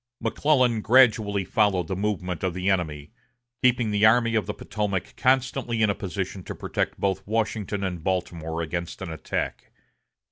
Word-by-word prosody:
McClellan 130 -7 +2
gradually 110 -5 +4
followed 95 -4 +2
the 95 - -2
movement 95 -3 -2
of 90 -2 -1
the 90 +2 +1
enemy, 75 -6 -2 0.5
keeping 120 -3 +3
the 105 0 +1
Army 115 +1 +5
of 110 -3 +1
the 105 - -2
Potomac 100 -2 -3
constantly 130 -3 +1
in 105 - +4
a - - 0
position 95 0 -4
to - - -6
protect - - -3
both 95 -1 0
Washington 105 -2 -1
and 90 -4 -3
Baltimore 85 -3 -2
against 85 +3 -4
an 85 - -5
attack. 80 - -4
100 Hz, 155 wpm, -25 LUFS, 90-110 Hz, 0.5 s, Army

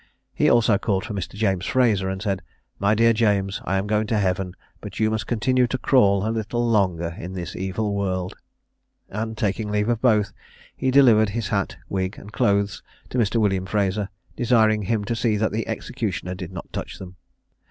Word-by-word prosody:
He - - +3
also 110 -4 +4
called 95 -4 -1
for 110 - -5
Mr. 100 -1 -5
James 95 -3 0
Fraser, 110 -7 +2
and 95 +1 -4
said, 100 -3 -1 0.4
"My 100 +2 +3
dear 115 +1 +4
James, 100 -3 +1
I 95 - 0
am 95 - -1
going 105 +1 0
to 110 - +1
heaven; 95 -2 -1 0.2
but - - -8
you 110 0 +2
must 110 0 -2
continue 125 +2 +2
to 130 - -2
crawl 100 -7 +3
a - - 0
little 115 +2 -1
longer 90 -7 +1
in 90 +3 -6
this 90 -2 -5
evil 100 +3 -2
world." 95 -2 -2 0.7
And, 110 +2 -4
taking 105 +1 -1
leave 105 +2 0
of 115 -2 0
both, 105 -5 +3 0.4
he 130 - -1
delivered 120 -6 +6
his 105 0 -3
hat, 100 -2 -1
wig, 95 0 -2
and 105 +2 -12
clothes, 100 0 +1 0.3
to 125 - -1
Mr. 110 -1 +1
William 95 -3 +1
Fraser, 100 0 0 0.3
desiring 110 -3 +3
him 105 +1 -1
to 115 +2 -1
see 110 -2 +1
that 110 +1 0
the 110 +1 -2
executioner 90 - -3
did 90 -1 -7
not 90 -2 -9
touch - - -5
them. 90 -1 -10
105 Hz, 195 wpm, -23 LUFS, 95-110 Hz, 0.7 s, delivered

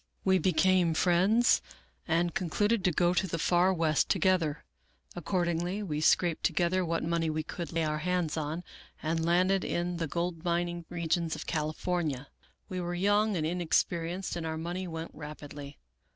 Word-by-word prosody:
We 190 -1 +4
became 185 -2 +3
friends, 190 +8 +4 0.5
and 170 +1 +1
concluded 205 +4 0
to 180 - +4
go 175 +2 +2
to 180 +2 +1
the 165 - -3
far 175 +3 +3
west 160 -4 +1
together. 170 -5 +1 0.5
Accordingly 175 +2 -1
we 150 -6 -3
scraped 170 +1 +3
to - - +3
gether 175 +3 +1
what 165 -1 -1
money 165 0 0
we 155 0 -2
could 170 +2 -6
lay 165 -1 0
our 155 -1 -1
hands 175 -1 -1
on, 160 +2 -3 0.4
and 160 +1 0
landed 185 +3 +3
in 175 0 -2
the 165 -1 -2
gold 170 +1 -3
mining 175 -1 -1
regions 170 -1 -1
of - - -7
California, 155 -2 -2 0.4
We 185 -1 -4
were 175 0 -3
young 205 +2 +2
and 155 - -1
inexperienced, 175 +1 0
and 170 - -4
our 160 0 -3
money 175 +3 -4
went 165 -1 -6
rapidly. 145 -1 -9
170 Hz, 165 wpm, -30 LUFS, 160-180 Hz, 0.5 s, We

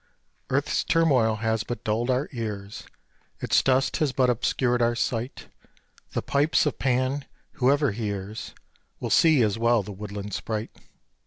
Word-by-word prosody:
Earths - - 0
turmoil 135 -10 +3
has 110 -1 +1
but 120 +4 -6
dulled 115 +3 -1
our 130 +3 +1
ears, 105 -5 -5 0.5
Its - - +3
dust 130 0 +2
has 150 -3 +1
but 130 -1 +3
obscured 125 +1 0
our 120 0 +2
sight. 120 +2 -3 0.7
The - - -2
pipes 145 +3 +2
of 150 - -2
Pan 130 +2 0 0.3
whoever 140 +1 +2
hears 105 -1 -5 0.4
Will - - -4
see 155 -7 +5
as 110 0 0
well 115 -2 +3
the 105 - -8
woodland 100 0 -7
sprite. 110 0 -3
120 Hz, 145 wpm, -26 LUFS, 110-130 Hz, 0.7 s, see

